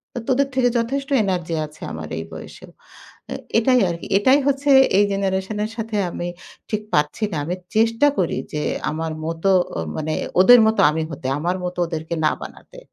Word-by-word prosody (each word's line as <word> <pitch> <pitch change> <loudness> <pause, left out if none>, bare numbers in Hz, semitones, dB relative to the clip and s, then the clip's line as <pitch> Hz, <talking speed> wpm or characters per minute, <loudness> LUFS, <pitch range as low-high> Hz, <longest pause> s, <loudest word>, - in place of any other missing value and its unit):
তো 245 - -2
তোদের 275 +2 +2
থেকে 245 -2 +3
যথেষ্ট 275 +4 -3
এনার্জি 175 -4 -2
আছে 150 - -20
আমার - - -6
এই - - -4
বয়সেও।" - - -11 0.6
এ - - -3 0.2
এটাই 250 +1 +3
আরকি। 170 0 -6
এটাই 260 +7 +4
হচ্ছে 280 +1 0 0.3
এই 205 - +5
জেনারেশনের 195 +2 -2
সাথে 225 -2 -4
আমি 175 +1 -4 0.4
ঠিক 215 -1 -1
পারছি 150 +8 +1
না। - - -2
আমি 180 +3 -3 0.2
চেষ্টা 230 +5 +3
করি 175 - 0 0.2
যে, 150 - -1 0.3
আমার 160 +1 -3
মতো 165 +4 -1 0.3
ও - - -2 0.2
মানে 155 0 -3 0.3
ওদের 245 +5 +8
মতো 220 - +2
আমি 160 +1 -2
হতে। 140 -3 -7
আমার 175 +4 -1
মতো 180 0 -5
ওদেরকে 160 0 -4
না - - +4
বানাতে। - - -11
195 Hz, 175 wpm, -21 LUFS, 165-235 Hz, 0.6 s, ওদের